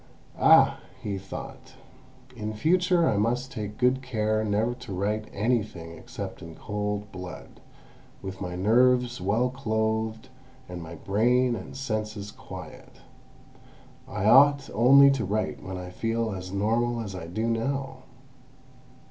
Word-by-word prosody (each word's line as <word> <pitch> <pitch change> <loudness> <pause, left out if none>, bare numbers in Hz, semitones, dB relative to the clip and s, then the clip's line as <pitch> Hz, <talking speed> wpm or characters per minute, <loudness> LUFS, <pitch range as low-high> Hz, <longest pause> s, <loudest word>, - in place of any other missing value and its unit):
"Ah!" - - +6 0.2
he 100 -2 -3
thought, 95 +1 -9 0.6
"in 110 -1 -4
future 175 - +3
I 105 - +2
must 125 +5 0
take 105 -4 -6
good 125 +1 +2
care 110 -4 0
never 110 +3 +1
to 125 -3 -10
write 105 +3 -2
anything 100 -7 -2
except - - -8
in 85 -1 -9
cold 105 -1 -4
blood, 90 -1 -9 0.6
with 95 0 -7
my 90 -2 -4
nerves 120 +3 +3
well 110 +7 +1
clothed, 110 -1 -2 0.4
and 90 -1 -7
my 80 0 -8
brain 120 +7 +2
and 95 +3 -8
senses 110 -5 -3
quiet. - - -11 1.1
I 95 - -3
ought 140 +4 +6
only 140 +5 +7
to 135 -4 -1
write 105 +3 -2
when 95 0 -6
I 90 0 -7
feel 115 +3 -1
as 95 -1 -7
normal 115 +4 0
as 100 -3 -6
I 90 -3 -7
do 110 +7 -2
now." 135 +4 -2
110 Hz, 135 wpm, -27 LUFS, 100-125 Hz, 1.1 s, only